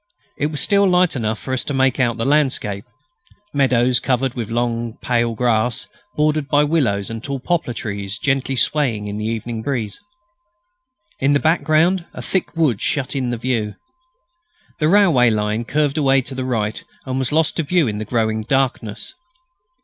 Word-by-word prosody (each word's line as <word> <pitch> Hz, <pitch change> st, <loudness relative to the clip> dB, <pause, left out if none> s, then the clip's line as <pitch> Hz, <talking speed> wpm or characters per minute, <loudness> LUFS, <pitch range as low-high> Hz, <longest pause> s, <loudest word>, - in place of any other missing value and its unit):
It 145 Hz, -, 0 dB
was 150 Hz, -2 st, -5 dB
still 200 Hz, +5 st, +3 dB
light 180 Hz, -2 st, +3 dB
enough 110 Hz, -3 st, -1 dB
for 130 Hz, -, -5 dB
us 130 Hz, -, 0 dB
to 145 Hz, -, -2 dB
make 130 Hz, 0 st, +2 dB
out 120 Hz, -2 st, +1 dB
the 115 Hz, -, -2 dB
landscape 130 Hz, -9 st, +1 dB, 0.7 s
meadows 130 Hz, -3 st, +3 dB
covered 130 Hz, -1 st, 0 dB
with 115 Hz, -3 st, -5 dB
long 120 Hz, 0 st, -2 dB
pale 120 Hz, -2 st, +1 dB
grass, 120 Hz, 0 st, 0 dB, 0.3 s
bordered 150 Hz, -1 st, +1 dB
by 145 Hz, 0 st, +3 dB
willows 120 Hz, -, 0 dB
and 115 Hz, 0 st, -6 dB
tall 140 Hz, -1 st, -3 dB
poplar 160 Hz, -3 st, -1 dB
trees 100 Hz, -2 st, -4 dB
gently 135 Hz, -1 st, 0 dB
swaying 125 Hz, -6 st, +1 dB
in 105 Hz, 0 st, -4 dB
the 105 Hz, -, -3 dB
evening 115 Hz, 0 st, -3 dB
breeze. 115 Hz, -6 st, -3 dB, 1.2 s
In 140 Hz, +2 st, +3 dB
the 145 Hz, -, +3 dB
background 165 Hz, +3 st, +2 dB
a -, -, -6 dB
thick 190 Hz, -3 st, -1 dB
wood 140 Hz, -11 st, +2 dB
shut 140 Hz, -1 st, -1 dB
in 130 Hz, -3 st, -1 dB
the 120 Hz, -, -2 dB
view. 115 Hz, -3 st, -2 dB, 1.0 s
The 155 Hz, -, +2 dB
railway 165 Hz, -, +5 dB
line 105 Hz, +1 st, -1 dB
curved 145 Hz, +2 st, 0 dB
away 135 Hz, -2 st, +4 dB
to 135 Hz, -, -6 dB
the 130 Hz, 0 st, -3 dB
right 110 Hz, -4 st, -2 dB, 0.2 s
and 130 Hz, 0 st, -2 dB
was 130 Hz, 0 st, -1 dB
lost 160 Hz, +1 st, +1 dB
to 165 Hz, -, +1 dB
view 165 Hz, -1 st, +2 dB
in 105 Hz, -1 st, -3 dB
the -, -, -2 dB
growing 110 Hz, -1 st, 0 dB
darkness. 125 Hz, -3 st, -1 dB
130 Hz, 175 wpm, -20 LUFS, 115-145 Hz, 1.2 s, railway